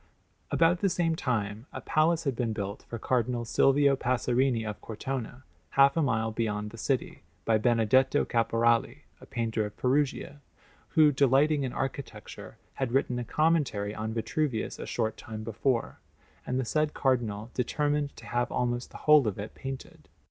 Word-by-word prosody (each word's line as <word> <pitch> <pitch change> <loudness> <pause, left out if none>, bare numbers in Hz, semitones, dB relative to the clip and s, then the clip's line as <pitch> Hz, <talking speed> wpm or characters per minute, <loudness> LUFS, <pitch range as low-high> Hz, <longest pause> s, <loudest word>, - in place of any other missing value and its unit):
About 170 +2 +3
the 195 - +2
same 165 -2 0
time 110 -4 -2
a - - -6
palace 160 +2 +1
had 135 -5 -1
been 115 -2 -1
built 100 -1 -5
for 115 - -4
Cardinal 120 0 0
Silvio 135 +3 +4
Passerini 125 -2 +1
of 105 - -6
Cortona, 125 +2 -5 0.3
half 140 0 +6
a 165 - +2
mile 110 -5 0
beyond 105 -2 -2
the 115 - -11
city, 130 0 -2 0.2
by 110 -1 +3
Benedetto 120 +4 +3
Caporali, 115 0 +1 0.2
a - - -14
painter 115 -2 -1
of 105 0 -7
Perugia, 140 +2 0 0.5
who, 155 -2 +6
delighting 140 +2 +3
in 130 - -2
architecture, 135 +1 -6 0.2
had 130 -3 -3
written 125 -2 +1
a - - -2
commentary 135 -8 +1
on 110 +1 -4
Vitruvius 115 +1 -2
a - - -6
short 110 -2 -2
time 110 -1 -7
before; 115 +2 -1 0.5
and 125 +1 0
the 130 - -1
said 155 +4 0
Cardinal 115 -4 0
determined 145 +3 -1
to - - -12
have 120 0 -1
almost 120 0 -1
the - - -10
whole 150 -5 +6
of 105 - -2
it 105 +2 -6
painted. 135 -1 -8
125 Hz, 165 wpm, -28 LUFS, 110-140 Hz, 0.5 s, half